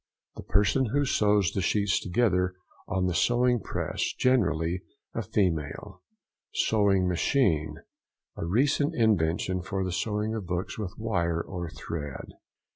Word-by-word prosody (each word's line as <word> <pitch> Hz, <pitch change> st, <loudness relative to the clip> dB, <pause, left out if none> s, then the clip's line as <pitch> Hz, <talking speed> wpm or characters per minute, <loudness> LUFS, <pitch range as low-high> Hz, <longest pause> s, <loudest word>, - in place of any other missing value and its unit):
—The -, -, -7 dB
person 105 Hz, +6 st, +2 dB
who 145 Hz, +6 st, +1 dB
sews 105 Hz, -6 st, +2 dB
the 95 Hz, -, -2 dB
sheets 100 Hz, +1 st, +1 dB
together 90 Hz, -2 st, +1 dB, 0.3 s
on 95 Hz, 0 st, 0 dB
the 90 Hz, -, 0 dB
sewing 120 Hz, +5 st, +3 dB
press—generally 90 Hz, -6 st, 0 dB, 0.3 s
a -, -, -2 dB
female. 80 Hz, -7 st, -2 dB, 0.5 s
SEWING 100 Hz, -4 st, +3 dB
MACHINE.—A 80 Hz, -, -2 dB
recent 140 Hz, -, +1 dB
invention 95 Hz, -, +1 dB
for 95 Hz, +1 st, -3 dB
the 95 Hz, -, -2 dB
sewing 105 Hz, +3 st, -1 dB
of 105 Hz, -5 st, -4 dB
books 90 Hz, +5 st, -3 dB
with 95 Hz, -4 st, -5 dB
wire 85 Hz, -7 st, -1 dB
and 85 Hz, -3 st, -5 dB
thread. 75 Hz, -4 st, -6 dB
95 Hz, 120 wpm, -28 LUFS, 85-110 Hz, 0.5 s, sewing